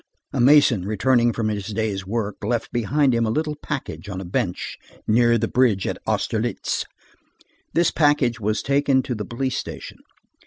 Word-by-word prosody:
A - - +1
mason 130 -7 +5
returning 120 +3 +2
from 110 -1 -1
his 100 -2 -3
day's 105 -3 -2
work, 105 -1 -3
left 115 +2 -1
behind 130 +4 +2
him 115 0 +2
a 110 - 0
little 150 +5 -1
package 135 -6 -6
on 95 -2 -4
a 95 - -6
bench 90 0 -3 0.3
near 115 +1 +4
the 115 +1 0
bridge 115 -7 +2
of - - -3
Austerlitz. - - -1 0.9
This 170 +1 +3
package 145 -6 +2
was 105 0 -1
taken 140 -1 +2
to 125 - -3
the 105 -3 -4
police 130 +4 -2
station. - - -8
115 Hz, 165 wpm, -22 LUFS, 105-130 Hz, 0.9 s, mason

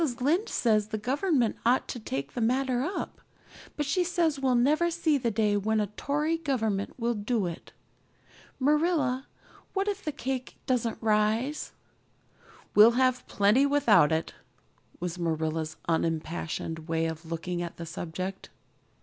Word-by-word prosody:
Lynde 325 - +1
says 215 -3 +2
the 215 0 -3
Government 260 - +1
ought 245 +2 +3
to 245 - -4
take 140 - -4
the 240 - -3
matter 250 +2 +1
up, 320 +9 -4 0.6
but 295 - 0
she 360 +6 +1
says 340 -5 +1
we'll 260 -2 +2
never 300 +8 +3
see 330 -2 +1
the 240 -2 0
day 210 -1 +1
when 215 +2 +1
a 210 - +2
Tory 300 +3 0
Government 220 -10 -1
will 240 -1 0
do 210 -1 -1
it. 170 -2 -6 0.9
Marilla, 290 -2 +2 0.5
what 390 0 0
if 410 0 -2
that 300 -2 -4
cake 260 -1 -3
doesn't 240 -3 0
rise?" 220 +6 +1 1.0
"We'll 220 +3 +8
have 255 -1 +2
plenty 210 +8 +3
without 260 - +4
it" 160 +1 -1 0.7
was 180 0 -4
Marilla's 160 -1 -1
unimpassioned 160 0 -2
way 165 0 0
of 160 0 -4
looking 170 +2 -4
at 170 -1 -6
the 170 - -6
subject. 175 +3 -5
235 Hz, 145 wpm, -28 LUFS, 180-280 Hz, 1.0 s, We'll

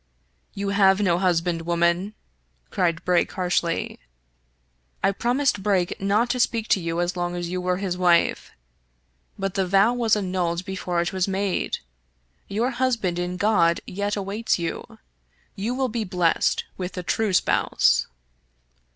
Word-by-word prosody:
" - - -44
You 200 0 -2
have 195 -1 +4
no 180 -4 +2
husband, 175 -2 +1
woman," 170 +4 0 0.6
cried 170 -3 0
Brake 180 -1 +2
harshly. 180 -3 -1 0.5
*' - - -42
I 195 - +4
promised 245 +2 0
Dayton 195 -1 0
not 220 +4 +2
to 250 - -2
speak 230 -2 +1
to - - +4
you 165 -1 -3
as 175 +1 -1
long 175 0 -2
as 175 -1 -4
you 180 +1 -3
were 180 0 0
his 185 -2 -3
wife, 175 -2 +2 0.9
but 195 -2 -2
the 190 -2 0
vow 200 +5 +4
was 235 -3 +2
annulled 180 -3 -1
before 180 -2 -2
it 170 - -2
was 185 0 0
made. 195 0 -1 0.7
Your 225 +6 -1
husband 235 -8 0
in 180 +1 -3
God 180 -5 +3
yet 205 +2 -2
awaits 200 +3 -1
you. 170 -2 -5 0.6
You 220 +6 -2
will 265 0 0
yet 230 0 -2
be - - 0
blessed 180 -3 +1
with 180 0 -4
the 180 - -5
true 215 +4 0
spouse." 180 - +2
185 Hz, 160 wpm, -24 LUFS, 175-205 Hz, 0.9 s, have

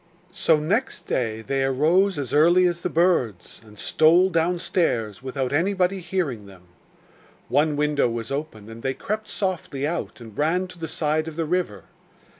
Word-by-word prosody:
So 160 -2 +3
next 210 - -1
day 110 -3 -2
they 135 +4 -1
arose 160 +9 +2
as 140 -3 -4
early 170 +5 +5
as 175 -1 0
the - - -2
birds 160 - 0
and 105 -1 -16
stole 170 - +4
downstairs 165 - 0
without 130 0 -3
anybody 185 +3 +1
hearing 165 - -3
them. 95 -2 -15 0.9
One 150 +1 +2
window 150 -3 +1
was 115 0 -5
open, 140 -7 -5
and 115 +1 -10
they 130 +1 -2
crept 215 +1 -4
softly 175 -8 -3
out 170 -2 -3
and 110 -3 -12
ran 165 +7 +1
to 180 - -13
the 165 - -4
side 155 0 -1
of 160 - -6
the 165 0 -1
river. 155 - -2
155 Hz, 165 wpm, -24 LUFS, 125-180 Hz, 0.9 s, early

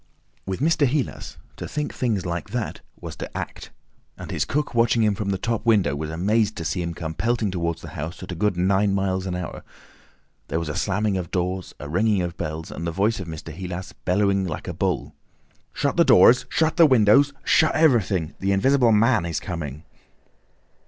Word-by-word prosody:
With 95 +5 -3
Mr. 155 -1 +3
Heelas 135 +1 -3 0.2
to - - -6
think 150 -1 -3
things 110 -7 -1
like 85 +3 -4
that 115 0 -4 0.2
was - - -7
to - - -6
act, - - -6 0.5
and - - -8
his - - 0
cook 150 0 -2
watching 115 -1 +3
him 105 -1 +3
from 100 0 -3
the 95 - 0
top 115 +3 -2
window 105 - +3
was 75 +1 -4
amazed 105 +6 +1
to 80 - -5
see 90 +4 -1
him 85 -1 -4
come 80 -1 -5
pelting 115 0 0
towards 85 -2 -3
the - - -7
house 80 +4 -6
at - - -7
a - - -4
good 105 +1 0
nine 95 +2 +2
miles 95 -1 -1
an 90 - -2
hour. 90 -2 -6 0.8
There - - -2
was 85 -2 -3
a 75 - -4
slamming 100 0 0
of 85 -3 -6
doors, 90 0 -3
a 75 - -7
ringing 95 +4 +1
of 85 0 -4
bells, 80 -1 -5
and 85 - -5
the - - -1
voice 100 +6 0
of 95 - -6
Mr. 80 -1 -7
Heelas 90 +2 -6
bellowing 100 0 +1
like 80 - -5
a - - -3
bull. - - -2 0.6
"Shut - - -1
the - - +6
doors, 125 +1 +6
shut 160 +1 +1
the 165 -2 +8
windows, 130 +3 +5
shut 155 - +3
everything!—the 100 - +2
Invisible 125 +4 +3
Man 110 -1 +3
is 85 - -2
coming!" 80 -5 -6
95 Hz, 200 wpm, -23 LUFS, 85-115 Hz, 0.8 s, the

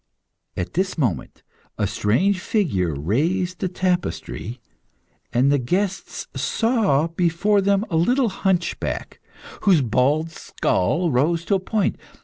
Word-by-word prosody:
At 90 - -3
this 185 +2 -1
moment 120 - -2 0.3
a - - +1
strange 185 - +1
figure 115 - 0
raised 165 - 0
the 190 - 0
tapestry, 175 - -2 0.7
and 125 +4 +3
the 145 - +3
guests 190 +9 -2
saw 220 - +1
before 175 +5 +1
them 200 +1 +2
a 165 - +2
little 245 +9 +2
hunchback, 190 -3 -2 0.4
whose 185 -7 +4
bald 140 +7 +1
skull 155 - 0
rose 165 +7 +1
in - - 0
a 195 - +3
point. 205 +2 -1
170 Hz, 125 wpm, -22 LUFS, 135-195 Hz, 0.7 s, whose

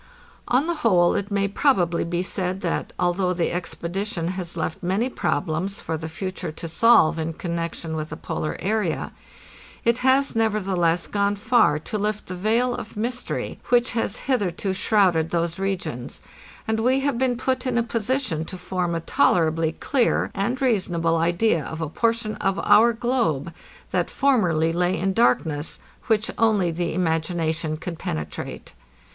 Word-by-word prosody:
On 255 +5 +2
the 345 - 0
whole, 175 -6 +4
it 200 0 -2
may 200 -1 +1
probably 190 -6 +2
be 175 +1 -1
said 185 0 -2
that, 170 - -2
although 180 +1 +1
the 170 - 0
expedition 175 0 -3
has 185 -1 -5
left 195 - -3
many 195 +8 0
problems 185 +1 -1
for 160 - -3
the 160 0 -5
future 185 +1 -5
to 165 +2 -7
solve 165 -3 +4
in 160 +1 -2
connection 170 -1 -4
with 155 0 -4
the 155 - -6
polar 160 -2 -3
area, 185 -9 -1 0.7
it 235 +1 +3
has, 265 +1 +3
nevertheless, 190 -6 +1
gone 200 0 0
far 220 -7 +3
to 210 +7 -4
lift 210 +1 -2
the 185 - -6
veil 230 +6 +1
of 225 -2 -7
mystery 245 +3 -3
which 245 0 +3
has 225 -4 -1
hitherto 200 -7 0
shrouded 185 -5 +2
those 170 0 -1
regions, 190 -11 -4 0.4
and 220 0 0
we 255 +4 +2
have 275 -3 0
been 255 -2 +1
put 260 0 -1
in 245 -1 0
a 235 - +3
position 230 - -1
to 185 - -7
form 180 -2 -2
a 165 - -2
tolerably 160 -1 +2
clear 255 +6 +1
and 240 +7 -1
reasonable 175 -9 +1
idea 170 +1 +2
of 160 +3 -6
a 160 - -2
portion 230 +5 0
of 195 0 0
our 235 +2 +6
globe 225 - -1 0.4
that - - 0
formerly 180 - +2
lay 180 +2 +1
in 195 +1 0
darkness, 160 -9 +1 0.3
which 220 -1 +1
only 210 -6 +3
the 170 +1 -2
imagination 160 -2 -1
could 165 +1 -6
penetrate. 80 -1 -5
185 Hz, 160 wpm, -24 LUFS, 165-225 Hz, 0.7 s, our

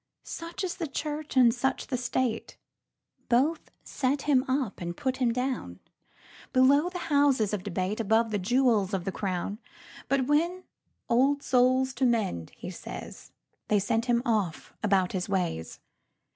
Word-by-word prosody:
Such 335 +4 -6
is 365 - -3
the 335 -4 -3
Church 295 0 -4
and 240 -3 +6
such 265 +2 -1
the 265 - -2
State.Both 250 +3 -2
set 275 +1 -1
him 270 -3 +3
up 260 -7 -1
and 175 0 -4
put 260 -1 -1
him 250 -3 +2
down,—Below 260 - -1
the 360 - -6 0.2
houses 270 -8 +3
of 205 - -1
debate, 190 +2 -2
Above 225 +1 +2
the 205 - 0
jewels 220 -2 +2
of 180 -2 -4
the 195 - -1
crown. 195 +2 -3 0.5
But 270 -1 +2
when 340 +6 +1 0.4
"Old 275 +4 +3
souls 255 +1 +3
to 260 +1 0
mend!" 200 - -1
he - - -7
says, - - -9 0.4
They 210 - +3
send 225 +4 0
him 240 -1 +2
off 210 -8 -1
about 195 -4 +2
his 185 +1 -3
ways. 175 - -2
245 Hz, 145 wpm, -28 LUFS, 205-270 Hz, 0.5 s, and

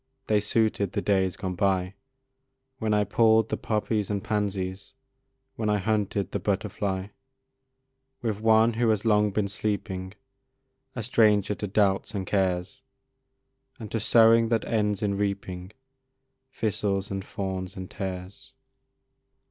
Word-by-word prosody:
They 105 -1 +3
suited 105 -2 0
the 100 - -1
days 95 -3 +1
gone 95 -2 -3
by, 95 0 0 0.9
When 110 -1 -1
I 105 0 +3
pulled 110 +1 +3
the - - 0
poppies 105 -1 -1
and 100 -2 -2
pansies, 100 -2 -2 0.6
When 110 -3 -1
I 105 - +3
hunted 100 -2 -1
the - - -2
butterfly, 100 -1 -2 1.1
With 110 -3 -2
one 110 +1 +5
who 115 +1 +1
has 110 0 +1
long 105 -1 +4
been 100 0 0
sleeping, 100 -2 -3 0.8
A 115 - -3
stranger 105 -3 +3
to 105 - -4
doubts 100 +1 +1
and 95 -2 -2
cares, 95 +5 -1 1.0
And 110 -3 -8
to 115 - -1
sowing 115 +1 +5
that 115 -2 +1
ends 105 -2 0
in 100 -1 0
reaping 100 -2 -3 0.8
Thistles, 100 -4 -1
and 95 0 -3
thorns, 95 -2 -4
and 95 0 -6
tares. 95 +5 -7
105 Hz, 130 wpm, -26 LUFS, 95-110 Hz, 1.1 s, one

